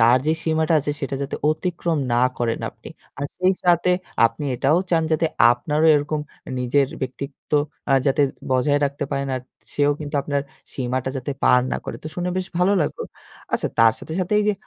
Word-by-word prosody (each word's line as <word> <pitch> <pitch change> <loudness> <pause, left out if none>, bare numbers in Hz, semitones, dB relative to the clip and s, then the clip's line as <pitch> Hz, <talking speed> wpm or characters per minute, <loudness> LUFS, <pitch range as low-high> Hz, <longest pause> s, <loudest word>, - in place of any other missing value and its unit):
তার 120 +3 +6
যে 155 - +4
সীমাটা 160 0 +2
আছে 145 +1 -2
সেটা 140 -1 -3
যাতে 140 - -3
অতিক্রম 170 0 -1
না 120 +1 +3 0.2
করেন 115 -1 0
আপনি। - - -13 0.3
আর 140 - -2
সেই 185 +1 +3
সাথে 175 0 +4 0.4
আপনি 115 +6 -6
এটাও 145 +7 +3
চান 165 -1 +3
যাতে 160 +1 +2 0.2
আপনারও 150 +6 +1
এরকম 150 +1 0 0.3
এ - - -6
নিজের 135 +3 +2
ব্যক্তিত্ব 135 +1 -6 0.4
আ - - +5
যাতে 145 +2 +3 0.3
বজায় 135 +3 +3
রাখতে 140 0 -2
পারেন 140 0 -1
আর 130 - -2 0.3
সেও 145 0 +3
কিন্তু 150 0 -6
আপনার 140 -1 -1 0.3
সীমাটা 130 0 -2
যাতে 130 +2 -4
পার 125 - +6
না - - +1
করে। - - -5
তো - - -7
শুনে 180 0 -2
বেশ 185 0 -1
ভালো 185 +3 +4
লাগলো। 150 - -2 0.5
আচ্ছা - - +1
তার 115 -1 +7
সাথে, 160 - -8
সাথে 185 +3 0
এইযে 210 0 +2
145 Hz, 190 wpm, -22 LUFS, 130-160 Hz, 0.5 s, তার